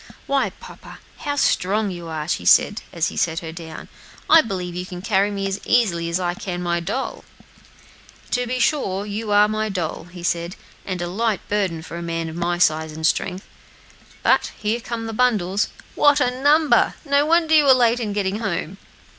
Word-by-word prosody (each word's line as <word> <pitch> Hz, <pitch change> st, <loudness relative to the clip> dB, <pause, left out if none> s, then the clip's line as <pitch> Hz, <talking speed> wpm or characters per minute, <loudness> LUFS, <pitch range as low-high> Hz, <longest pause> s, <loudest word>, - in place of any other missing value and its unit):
"Why, 275 Hz, -1 st, +1 dB
papa, -, -, -13 dB, 0.2 s
how 285 Hz, -1 st, -3 dB
strong 205 Hz, -5 st, +1 dB
you 175 Hz, -2 st, -7 dB
are," 155 Hz, -2 st, -4 dB
she -, -, -1 dB
said, 205 Hz, -, +4 dB
as 165 Hz, -2 st, 0 dB
he -, -, -10 dB
set 165 Hz, -1 st, 0 dB
her 160 Hz, -1 st, -6 dB
down. 160 Hz, -1 st, -9 dB, 0.4 s
"I 325 Hz, -, +8 dB
believe 185 Hz, -, -4 dB
you 180 Hz, +1 st, -4 dB
can 180 Hz, 0 st, -8 dB
carry 200 Hz, -1 st, +2 dB
me 200 Hz, -1 st, -3 dB
as 195 Hz, +1 st, -3 dB
easily 175 Hz, -9 st, +1 dB
as 170 Hz, +2 st, 0 dB
I 175 Hz, -1 st, -1 dB
can 180 Hz, -1 st, -5 dB
my 170 Hz, 0 st, 0 dB
doll." 205 Hz, +10 st, -4 dB, 1.1 s
"To 245 Hz, 0 st, 0 dB
be 255 Hz, +1 st, -2 dB
sure; 205 Hz, -7 st, 0 dB
you 210 Hz, +1 st, -4 dB
are 205 Hz, 0 st, +6 dB
my 215 Hz, 0 st, -1 dB
doll," 170 Hz, -3 st, -4 dB, 0.2 s
said 170 Hz, +1 st, -1 dB
he, -, -, -18 dB
"and 180 Hz, -1 st, -2 dB
a -, -, -1 dB
very 175 Hz, -, -6 dB
light 225 Hz, -4 st, 0 dB
burden 190 Hz, -6 st, -1 dB
for 170 Hz, -, -8 dB
a -, -, -5 dB
man 165 Hz, -1 st, -3 dB
of 160 Hz, -, -8 dB
my 175 Hz, 0 st, -1 dB
size 160 Hz, -2 st, +2 dB
and 160 Hz, +1 st, -4 dB
strength. 185 Hz, +4 st, 0 dB, 0.8 s
But -, -, +3 dB
here 215 Hz, +3 st, -1 dB
come 230 Hz, -1 st, -5 dB
the 225 Hz, -, -5 dB
bundles! 210 Hz, -5 st, +1 dB, 0.3 s
what 290 Hz, 0 st, +4 dB
a 250 Hz, -3 st, +2 dB
number! 285 Hz, 0 st, +3 dB
no 285 Hz, +1 st, +2 dB
wonder 325 Hz, -1 st, +3 dB
you 305 Hz, -2 st, +6 dB
were 270 Hz, -, +8 dB
late 240 Hz, -1 st, +3 dB
in 220 Hz, -3 st, -2 dB
getting 200 Hz, 0 st, -1 dB
home." 195 Hz, -3 st, -3 dB
195 Hz, 200 wpm, -22 LUFS, 175-235 Hz, 1.1 s, I